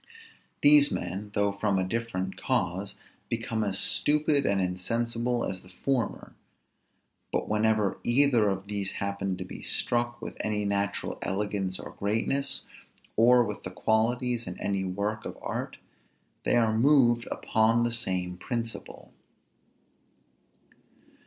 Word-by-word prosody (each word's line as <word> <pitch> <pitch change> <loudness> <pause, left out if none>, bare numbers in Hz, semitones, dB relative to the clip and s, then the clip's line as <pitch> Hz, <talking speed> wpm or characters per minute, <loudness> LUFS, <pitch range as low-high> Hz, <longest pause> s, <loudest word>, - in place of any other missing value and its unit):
These 145 0 +8
men, 100 +4 -4
though 100 -1 +2
from 100 0 0
a 95 - +1
different 95 -2 -3
cause, 95 -6 -1 0.3
become 115 -1 -1
as 100 -2 0
stupid 145 +3 +2
and 100 -1 +2
insensible 115 +6 -1
as 95 - -4
the 95 - -16
former; 125 +7 -2 1.0
but - - -1
whenever 105 -2 +1
either 120 -4 +4
of 95 0 -3
these 100 -1 -2
happen 100 -1 -2
to - - -6
be - - -9
struck 120 0 -1
with - - -7
any 105 -1 -1
natural 100 0 -1
elegance 95 -1 -1
or - - -8
greatness, 115 +7 -1 0.5
or 120 +2 +6
with 105 -2 -5
these 90 - -7
qualities 120 +2 +1
in 90 - -6
any 100 -1 -1
work 100 +3 -2
of - - -7
art, - - -4 0.7
they - - +3
are 110 -2 +3
moved 120 -2 +4
upon 115 +1 +2
the 120 - +1
same 90 -6 +1
principle. 115 +3 -5
110 Hz, 130 wpm, -28 LUFS, 100-120 Hz, 1.0 s, These